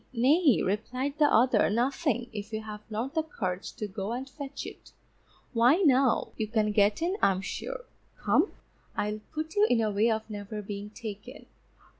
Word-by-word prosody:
Nay_, 275 - +4
replied 255 +9 -2
the 295 -1 +5
other, 235 -1 +5
_nothing, 245 +2 0
if 210 0 -6
you 220 0 -3
have 210 -1 -8
not 230 +6 -3
the 320 - +2
courage 190 - -4
to 210 - -4
go 200 +2 -4
and 260 +2 -4
fetch 280 0 -7
it; - - -11 0.6
why 240 +4 +5
now, 265 -3 +3
you 215 - -1
can 215 -1 +1
get 205 +6 +3
in 365 +4 0
I'm 190 -1 +3
sure. - - -5 0.3
Come, - - +2 0.5
I'll 210 +1 -1
put 315 +1 -4
you 415 +1 +5
in 240 - +3
a 220 -2 +1
way 210 +3 +3
of 220 -1 -1
never 210 0 -6
being 205 0 -6
taken. 220 +3 -8
230 Hz, 175 wpm, -29 LUFS, 210-275 Hz, 0.6 s, the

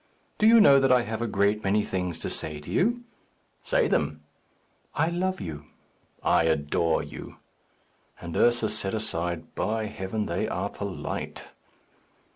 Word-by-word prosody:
"Do 215 - +5
you 230 +1 +8
know 140 -9 +7
that 135 -1 +3
I 125 -1 +5
have 110 -1 -4
a 120 - 0
great 100 +1 +1
many 105 +2 +2
things 90 -4 -3
to - - -3
say 75 -1 -4
to 75 - -9
you?" 240 +5 +1 0.6
"Say - - +2
them." - - -1 0.7
"I 160 - +2
love 185 +2 -1
you." 75 -5 -6 0.6
"I 85 - +3
adore 80 +1 +1
you." - - -10 0.8
And 85 -1 -7
Ursus 120 -3 +3
said 100 0 -2
aside, 85 -5 -2
"By 110 0 -1
heaven, 105 +1 -3
they - - -1
are - - -2
polite!" - - -5
105 Hz, 150 wpm, -27 LUFS, 85-130 Hz, 0.8 s, you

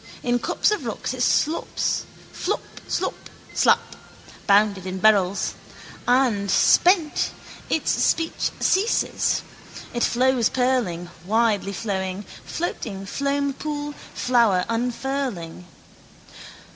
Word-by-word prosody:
In 245 0 +1
cups - - +1
of 425 - -1
rocks - - -3
it - - -5
slops: 315 +2 +1 0.3
flop, 410 - -2 0.2
slop, - - -1 0.4
slap: - - +2 0.5
bounded 200 -2 +3
in 185 0 -4
barrels. 200 -2 +3 0.5
And, 245 -6 +2
spent, 340 - +4 0.4
its 320 - +1
speech 325 -1 +1
ceases. 405 +5 +1 0.5
It 240 - 0
flows 250 -2 +2
purling, 235 -10 0
widely 215 0 +1
flowing, 190 -2 -3 0.2
floating 210 - -4
foampool, 285 +4 -2 0.2
flower 230 -7 +3
unfurling. 235 -7 -3
235 Hz, 95 wpm, -23 LUFS, 200-280 Hz, 0.5 s, spent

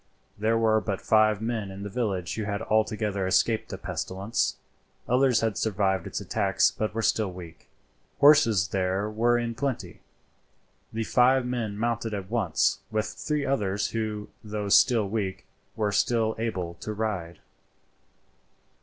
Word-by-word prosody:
There 110 +2 +1
were 110 -1 +3
but 100 -3 -3
five 110 -1 +3
men 110 -3 -2
in 95 +1 -8
the - - -4
village 100 -6 -2
who 110 - -3
had 100 +1 -3
altogether 105 -3 0
escaped 110 +4 +2
the - - -5
pestilence; 95 +4 -2 0.5
others 125 -1 +3
had 110 -2 -1
survived 95 -4 0
its - - -4
attacks, 95 0 +1
but 110 0 -3
were 115 - -1
still 110 -4 +1
weak. 90 -2 -11 0.5
Horses 115 - +5
there 95 +2 0
were 120 +2 +2
in 120 -1 -2
plenty. 130 +1 -4 0.9
The 115 +1 -2
five 125 +3 +3
men 115 -5 -3
mounted 115 -1 -1
at 100 0 -7
once, 100 -9 +1
with 110 0 -1
three 150 -2 -2
others 100 -7 0
who, 110 -2 -3
though 105 -1 -4
still 110 0 +5
weak, 100 -2 -3 0.3
were 105 -2 0
still 110 +1 +1
able 95 -7 -2
to 110 - -4
ride. 100 -6 -3
110 Hz, 145 wpm, -27 LUFS, 100-115 Hz, 0.9 s, Horses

